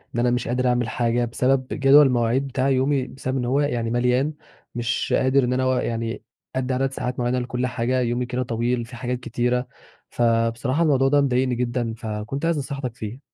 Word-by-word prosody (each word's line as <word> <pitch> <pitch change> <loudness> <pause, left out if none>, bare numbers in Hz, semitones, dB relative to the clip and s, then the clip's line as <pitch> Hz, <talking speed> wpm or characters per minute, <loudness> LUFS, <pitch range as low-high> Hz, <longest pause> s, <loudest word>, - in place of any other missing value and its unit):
إن - - 0
أنا 120 0 +2
مش 125 0 -1
قادر 125 +1 0
أعمل 120 -2 +1
حاجة 120 +1 0
بسبب 130 +2 +1
جدول 140 +1 +6
المواعيد 125 +2 +1
بتاعي 135 +1 +1
يومي 130 0 +1
بسبب 130 0 -4
إن 125 - -1
هو 130 +4 +1
يعني 120 -5 -1
مليان، 125 +5 +1 0.4
مش 120 -2 -1
قادر 130 +1 +3
إن 125 +1 0
أنا 130 - 0
أوا 130 -1 +1
يعني 115 0 -3 0.3
أدّي 130 0 -1
عدد 135 +1 0
ساعات 125 -1 -4
معيّنة 120 +1 0
لكُلّ 125 0 -2
حاجة، 125 +1 -1
يومي 120 +1 0
كده 125 +1 -2
طويل 120 0 -1
في 120 - -11
حاجات 125 +1 -3
كتيرة، 125 +1 -1 0.4
فبصراحة 115 +5 +1
الموضوع 135 -4 +3
ده 145 +1 +4
مضايقني 130 -2 +1
جدًا، 120 -1 -1
فكنت 110 +6 -4
عايز 165 -1 +1
نصيحتك 135 -3 -4
فيه. 115 +2 -7
125 Hz, 195 wpm, -23 LUFS, 120-130 Hz, 0.4 s, جدول